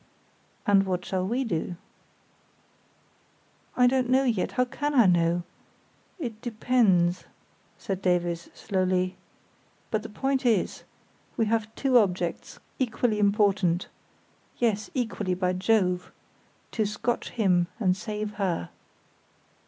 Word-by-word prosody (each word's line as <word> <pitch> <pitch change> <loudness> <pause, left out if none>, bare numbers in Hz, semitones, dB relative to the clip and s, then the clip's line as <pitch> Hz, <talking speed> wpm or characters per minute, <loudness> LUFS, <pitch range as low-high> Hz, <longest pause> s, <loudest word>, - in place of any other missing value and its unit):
"And 195 -1 +4
what 180 -1 -2
shall 185 -1 -1
we 245 +6 0
do?" 175 -5 -2 2.0
"I 250 - +6
don't 250 0 +2
know 260 +1 +4
yet; 230 -8 0
how 250 0 +2
can 290 +4 -3
I 240 -4 +7
know? 175 -1 +3 0.7
It 235 - -6
depends," 215 -7 +2 0.5
said 195 -1 -4
Davies, 175 -2 0
slowly. 185 -2 0 0.8
"But 215 - +1
the 220 - -8
point 270 +5 -1
is, 225 -7 +1
that - - -23 0.5
we 225 - +2
have 220 0 -1
two 260 -3 +4
objects, 180 -4 -2 0.2
equally 235 -3 0
important—yes, 205 +2 -1
equally, 215 -7 -1
by 180 0 0
Jove!—to 185 +2 -2
scotch 210 +3 -2
him, 180 -7 +2
and 185 -5 +2
save 210 +1 -4
her." 170 - -1
210 Hz, 115 wpm, -27 LUFS, 180-235 Hz, 2.0 s, I